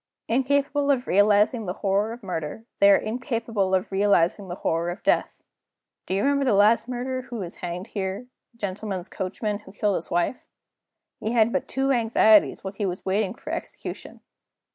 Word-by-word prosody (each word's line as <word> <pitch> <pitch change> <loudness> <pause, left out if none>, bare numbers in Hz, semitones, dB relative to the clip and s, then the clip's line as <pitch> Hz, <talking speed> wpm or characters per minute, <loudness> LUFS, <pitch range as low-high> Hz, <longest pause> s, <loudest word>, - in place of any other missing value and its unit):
Incapable 280 +3 +1
of 265 -3 +2
realizing 210 +3 +3
the 180 - -2
horror 200 +3 +2
of 235 0 -9
murder, 180 +3 -5
they 200 - +7
are 200 - +8
incapable 225 -4 -1
of 185 +1 -2
realizing 195 -1 +2
the 175 - -5
horror 165 -1 -1
of 175 - -6
death. - - 0 0.6
Do 190 - -1
you 200 - 0
remember 280 0 +2
the 250 -6 +3
last 210 +4 +4
murderer 255 +1 -3
who 245 -1 -9
was 185 -6 -6
hanged 175 +1 -5
here 195 +3 -4 0.3
a 235 - -28
gentleman's 195 -2 -4
coachman 205 +2 -3
who 210 - -14
killed 205 0 0
his 165 - -7
wife? 175 +8 -1 0.8
He 220 +2 -2
had 230 -1 +3
but - - -1
two 270 +1 0
anxieties 225 -3 +4
while 190 - -5
he 200 0 -2
was 180 0 -5
waiting 195 0 0
for - - -8
execution. - - -7
210 Hz, 180 wpm, -25 LUFS, 190-235 Hz, 0.8 s, are